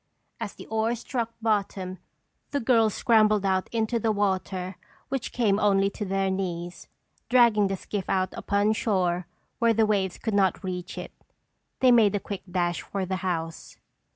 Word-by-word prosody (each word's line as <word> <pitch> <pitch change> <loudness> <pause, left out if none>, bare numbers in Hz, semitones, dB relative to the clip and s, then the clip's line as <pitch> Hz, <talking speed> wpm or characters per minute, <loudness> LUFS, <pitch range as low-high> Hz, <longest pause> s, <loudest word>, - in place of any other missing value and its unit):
As - - -5
the - - -10
oars 220 +2 0
struck 235 -4 -3
bottom, 195 -4 -1 0.5
the 285 - -1
girls 225 -4 +3
scrambled 215 -4 +3
out 190 -1 +1
into 230 0 0
the 225 0 +1
water 190 -2 -1 0.3
which 270 -2 -3
came 215 -4 +2
only 195 -1 +3
to 210 - -5
their 195 0 0
knees, 175 -2 -4 0.4
dragging 235 -5 +5
the 195 0 -2
skiff 195 0 -5
out 185 -1 0
upon 205 +1 +1
shore 180 -5 0 0.3
where 230 -2 +3
the 220 0 +4
waves 195 -4 0
could 220 - -3
not 195 0 +2
reach 180 -1 -5
it. - - -6 0.7
They 255 -1 +6
made 220 -4 +5
a - - +1
quick 200 -1 -6
dash 175 -1 0
for 195 -2 -3
the 185 +1 -2
house. 165 -3 -4
200 Hz, 165 wpm, -26 LUFS, 185-220 Hz, 0.7 s, They